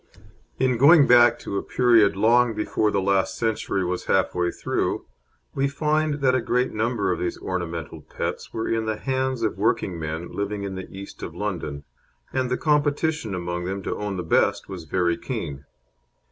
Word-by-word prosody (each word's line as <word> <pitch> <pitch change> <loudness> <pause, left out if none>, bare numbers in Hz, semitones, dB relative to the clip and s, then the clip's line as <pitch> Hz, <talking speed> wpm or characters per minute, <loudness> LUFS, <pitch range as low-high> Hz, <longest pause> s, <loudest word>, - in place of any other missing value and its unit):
In 130 -1 +2
going 145 +2 +8
back 120 -1 +6
to 100 - -3
a - - -4
period 115 -5 +4
long 115 +3 +3
before 105 0 0
the 100 - 0
last 95 -1 +1
century 105 -4 -1
was 90 +1 -3
half 95 - +2
way 90 -1 0
through, - - -2 0.5
we 135 - +1
find 150 +1 0
that 130 -2 +3
a 130 - +2
great 125 +2 0
number 110 -3 0
of 90 - -1
these 90 - -2
ornamental 85 -4 -4
pets - - -5
were 110 - -3
in 115 -1 -1
the 110 -1 -1
hands 130 -1 -1
of 105 -4 -1
working 95 -4 0
men 80 +2 -5
living 100 0 -3
in 100 -1 -4
the 95 0 -7
East 100 +1 -10
End - - -4
of 80 - -17
London, 85 -8 -4 0.5
and 130 -1 0
the 125 - 0
competition 150 - +1
among 90 0 -3
them 95 +1 -4
to - - -2
own 105 -2 -3
the 90 - -3
best 80 - +1
was 95 -4 -7
very 85 +1 +1
keen. 70 -1 -5
105 Hz, 190 wpm, -24 LUFS, 90-125 Hz, 0.5 s, going